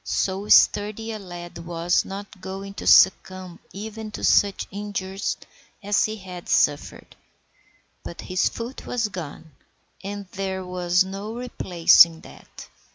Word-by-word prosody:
So 195 Hz, +2 st, -2 dB
sturdy 215 Hz, +2 st, +4 dB
a 215 Hz, -, -5 dB
lad 175 Hz, -3 st, -9 dB
was 170 Hz, +1 st, 0 dB
not 195 Hz, 0 st, -9 dB
going 195 Hz, +1 st, -7 dB
to -, -, -7 dB
succumb 185 Hz, -1 st, +4 dB
even 215 Hz, +2 st, -7 dB
to -, -, -7 dB
such 200 Hz, -1 st, +3 dB
injuries 200 Hz, -1 st, -4 dB, 0.5 s
as 205 Hz, +1 st, +2 dB
he 215 Hz, -, -3 dB
had 185 Hz, -4 st, -10 dB
suffered. 145 Hz, 0 st, 0 dB, 0.9 s
But 170 Hz, -, -8 dB
his 185 Hz, 0 st, 0 dB
foot 235 Hz, +3 st, -8 dB
was 230 Hz, -3 st, -1 dB
gone, 160 Hz, -3 st, -8 dB, 0.5 s
and 200 Hz, +1 st, -6 dB
there 190 Hz, -1 st, -4 dB
was 180 Hz, 0 st, +1 dB
no 200 Hz, +4 st, -6 dB
replacing 170 Hz, -8 st, +4 dB
that. -, -, -14 dB
190 Hz, 130 wpm, -24 LUFS, 180-205 Hz, 0.9 s, sturdy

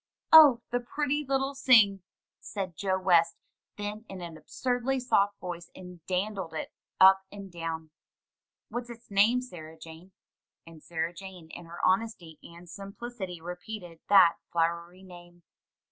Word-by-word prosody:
"Oh, 290 Hz, -7 st, +9 dB
the 245 Hz, -, +1 dB
pretty 290 Hz, +4 st, -2 dB
little 270 Hz, 0 st, -1 dB
sing!" 220 Hz, -8 st, +5 dB, 0.4 s
said 190 Hz, -4 st, -6 dB
Joe 190 Hz, +2 st, -1 dB
West 170 Hz, -3 st, +3 dB, 0.4 s
then, 210 Hz, +1 st, -5 dB
in 190 Hz, -, -8 dB
an 170 Hz, -2 st, -8 dB
ab -, -, -17 dB
surdly 255 Hz, +1 st, -1 dB
soft 205 Hz, -5 st, +1 dB
voice, 175 Hz, -1 st, -7 dB
and 180 Hz, -3 st, -12 dB
dandled 185 Hz, -3 st, -3 dB
it -, -, -5 dB, 0.3 s
up 190 Hz, 0 st, +7 dB
and 200 Hz, -2 st, -10 dB
down. 165 Hz, -2 st, -6 dB, 0.8 s
"What's 240 Hz, 0 st, -5 dB
its 235 Hz, -1 st, -12 dB
name, 215 Hz, +5 st, +4 dB
Sarah 160 Hz, -8 st, -11 dB
Jane?" 165 Hz, +3 st, -13 dB, 0.5 s
And 165 Hz, -2 st, -14 dB
Sarah 165 Hz, +1 st, -3 dB
Jane 180 Hz, -3 st, -11 dB
in 175 Hz, -, -10 dB
her 170 Hz, +1 st, -10 dB
honesty 185 Hz, -5 st, -1 dB
and 170 Hz, +1 st, -14 dB
simplicity 200 Hz, 0 st, -8 dB
repeated 180 Hz, 0 st, -8 dB
that 190 Hz, -4 st, +6 dB
flowery 170 Hz, +2 st, -2 dB
name. 175 Hz, -1 st, -15 dB
190 Hz, 145 wpm, -28 LUFS, 170-220 Hz, 0.8 s, Oh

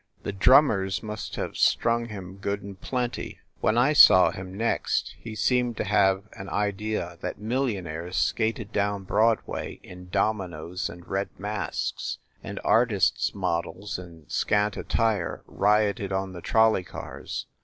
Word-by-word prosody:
The -, -, -2 dB
drummers 100 Hz, -3 st, +4 dB
must 105 Hz, 0 st, -5 dB
have -, -, -4 dB
strung 115 Hz, 0 st, +2 dB
him 95 Hz, -3 st, -8 dB
good 100 Hz, +1 st, -3 dB
and 100 Hz, -1 st, -10 dB
plenty. 125 Hz, -2 st, -3 dB, 0.2 s
When 110 Hz, -, +2 dB
I 130 Hz, +5 st, +4 dB
saw 95 Hz, -10 st, +8 dB
him 90 Hz, 0 st, -7 dB
next 115 Hz, +2 st, 0 dB
he 115 Hz, -2 st, -8 dB
seemed 125 Hz, 0 st, +1 dB
to -, -, 0 dB
have 100 Hz, -2 st, +3 dB
an 95 Hz, 0 st, -8 dB
idea 100 Hz, -4 st, -2 dB
that -, -, -4 dB
millionaires 95 Hz, -, -2 dB
skated 110 Hz, -1 st, 0 dB
down 100 Hz, -1 st, 0 dB
Broadway 110 Hz, +4 st, 0 dB
in 90 Hz, 0 st, -12 dB
dominos 90 Hz, -4 st, -1 dB
and 85 Hz, 0 st, -11 dB
red 100 Hz, +1 st, -1 dB
masks, 105 Hz, +1 st, -3 dB, 0.3 s
and -, -, -6 dB
artists 110 Hz, -6 st, +2 dB
models 90 Hz, +4 st, -2 dB
in 85 Hz, -4 st, -12 dB
scant 105 Hz, 0 st, +1 dB
attire 110 Hz, -6 st, -1 dB
rioted 105 Hz, -1 st, +1 dB
on 95 Hz, 0 st, -2 dB
the 90 Hz, -, -8 dB
trol 110 Hz, +3 st, +4 dB
ley 95 Hz, -, -1 dB
cars. 90 Hz, -, -7 dB
100 Hz, 145 wpm, -26 LUFS, 95-110 Hz, 0.3 s, saw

